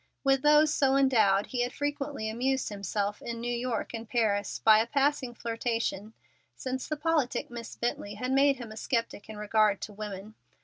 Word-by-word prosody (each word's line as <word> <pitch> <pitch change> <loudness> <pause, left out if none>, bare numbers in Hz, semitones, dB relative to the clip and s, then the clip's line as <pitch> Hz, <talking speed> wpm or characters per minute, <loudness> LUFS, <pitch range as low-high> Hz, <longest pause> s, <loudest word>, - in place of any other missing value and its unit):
With 270 -1 +3
those 300 +1 +5
so 270 -1 +3
endowed 220 -8 +4
he 250 -2 -2
had 245 +1 0
frequently 285 -4 -3
amused 255 +4 -1
himself 205 0 -3
in 235 -1 -5
New 240 +1 -2
York 240 -1 -3
and 225 -1 -6
Paris 205 -4 0
by 215 -1 +6
a 225 - +1
passing 275 -2 0
flirtation 230 -2 -2 0.4
since 260 0 -4
the 305 - -3
politic 295 -7 0
Miss 235 -1 -7
Bently 210 -3 -3
had 250 +5 -3
made 275 +1 +4
him 240 -4 -9
a 220 - -10
sceptic 230 -3 -2
in 215 - -7
regard 210 -1 +2
to 210 - -6
women. 205 0 -7
235 Hz, 180 wpm, -29 LUFS, 215-270 Hz, 0.4 s, by